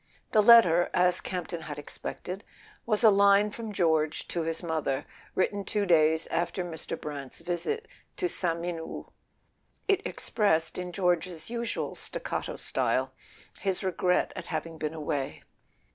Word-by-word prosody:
The 215 - +5
letter, 205 -7 +7
as 180 0 +4
Campton 175 -2 -4
had 150 -2 -6
expected, 180 +6 -6 0.4
was 215 0 +3
a 220 - +9
line 200 +1 +5
from 225 0 -6
George 160 -5 +1
to 170 - -1
his 165 +1 -1
mother, 155 -4 -1 0.3
written 200 +2 +1
two 205 0 0
days 160 -2 +4
after 175 +2 -1
Mr. 165 -2 -4
Brant's 145 -1 -6
visit 175 - -2 0.3
to 360 - +1
Sainte 170 - 0
Mene 175 -1 -3
hould. 160 - -8 0.8
It 400 -1 +3
expressed, 165 -6 0
in 180 0 -4
George's 175 0 -1
usual 235 -1 -2
staccato - - -4
style, - - 0 0.5
his 195 -2 -1
regret 180 -1 +1
at - - -7
having 165 0 -4
been 155 +1 -3
away. 145 -3 -3
175 Hz, 145 wpm, -28 LUFS, 160-200 Hz, 0.8 s, a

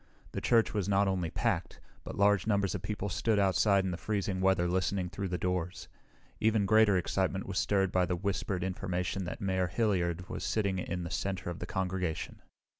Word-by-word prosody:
The - - -4
church 115 -2 +3
was 100 -3 -1
not 100 0 +3
only 90 -3 0
packed, - - -1 0.2
but - - -7
large 100 -1 +3
numbers 100 -3 +1
of - - -3
people 105 -1 -3
stood 105 +4 +1
outside 100 0 +3
in 95 - -1
the 85 - -3
freezing 100 -2 -2
weather 95 -2 +3
listening 90 +1 0
through 100 -1 -3
the 90 -1 -2
doors. 90 -1 -3 0.5
Even 110 -2 +2
greater 110 -1 +5
excitement 95 +1 -1
was 95 -1 -1
stirred 95 -2 +1
by 90 -1 +2
the 90 - 0
whispered 95 0 -2
information 95 0 -2
that 85 - -6
Mayor 95 -2 +1
Hilliard 90 -4 0
was - - -5
sitting 100 -4 0
in 90 -1 -3
the 85 - -6
center 95 -2 -2
of 85 - -7
the - - -5
congregation. 90 -3 -3
95 Hz, 190 wpm, -31 LUFS, 90-100 Hz, 0.5 s, greater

